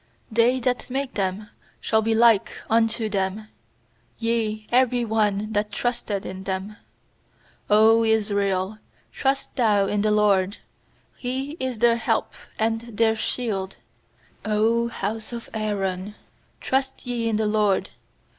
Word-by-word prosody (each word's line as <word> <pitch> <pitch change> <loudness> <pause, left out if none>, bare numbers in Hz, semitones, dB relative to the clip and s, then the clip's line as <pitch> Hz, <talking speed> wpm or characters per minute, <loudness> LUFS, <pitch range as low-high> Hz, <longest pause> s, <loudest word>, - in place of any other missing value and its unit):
They 235 +3 +3
that 250 +1 -1
make 270 +1 -2
them 195 +1 -2 0.3
shall 220 - +1
be 225 +1 +1
like 225 -3 +4 0.2
unto 225 0 +2
them; 200 +1 -2 0.7
Yea, 225 -2 -1
every 250 -1 +3
one 215 -1 0
that 210 0 0
trusteth 235 -5 -2
in 190 0 -6
them. 195 +2 -3 0.9
90 220 +2 +5
Israel, 200 -2 0 0.3
trust 270 0 -1
thou 210 -6 +3
in 205 +1 0
the 215 - +2
LORD! 205 -2 +2 0.6
He 265 +3 -3
is 260 -2 -2
their 235 +1 +4
help - - -1 0.2
and 225 0 -2
their 225 -1 +3
shield! 210 -4 -2 0.7
100 220 +2 +2
house 220 +1 -4
of 235 -1 -7
Aaron, 205 -2 -2 0.4
trust 265 0 -1
ye 235 -2 -1
in 220 - 0
the 215 0 +1
LORD! 210 -2 +1
220 Hz, 125 wpm, -24 LUFS, 205-235 Hz, 0.9 s, 90